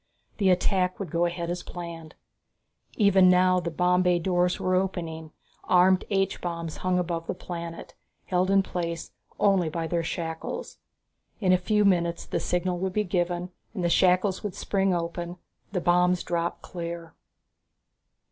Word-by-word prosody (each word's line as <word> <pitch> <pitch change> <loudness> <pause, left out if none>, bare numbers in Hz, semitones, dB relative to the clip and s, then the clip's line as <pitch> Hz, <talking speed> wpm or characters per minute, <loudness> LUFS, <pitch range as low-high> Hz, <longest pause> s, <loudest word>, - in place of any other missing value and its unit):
The 195 -2 +3
attack 185 0 +2
would 190 -6 -5
go 170 +1 +2
ahead 170 0 -2
as 175 0 -3
planned. 170 -3 -8 0.8
Even 195 -3 +5
now, 185 0 +4
the 170 -1 -3
bomb 180 +2 +2
bay 180 -1 +3
doors 180 +1 +1
were 185 - 0
opening; 170 -4 -2 0.4
armed 185 +1 +4
H 195 -1 0
bombs 170 -2 -4
hung 185 0 0
above 170 -2 -2
the - - -2
planet, 170 -2 -7 0.3
held 185 0 +1
in 195 0 +4
place 170 -3 -4 0.3
only 195 -5 +3
by 165 +1 -3
their 170 +1 0
shackles. 160 -1 -5 0.6
In 185 -3 +3
a - - +6
few 210 +3 +2
minutes 170 -3 +1
the - - -2
signal 180 +1 -1
would 190 0 -2
be 210 - +1
given 175 -1 -1 0.2
and 185 - -2
the 175 - +2
shackles 185 +2 +3
would 205 -4 -5
spring 195 -1 0
open, 175 0 -3 0.3
the 190 - 0
bombs 180 +1 +3
drop 170 0 -2
clear.... 170 -1 -6
180 Hz, 155 wpm, -26 LUFS, 170-185 Hz, 0.8 s, a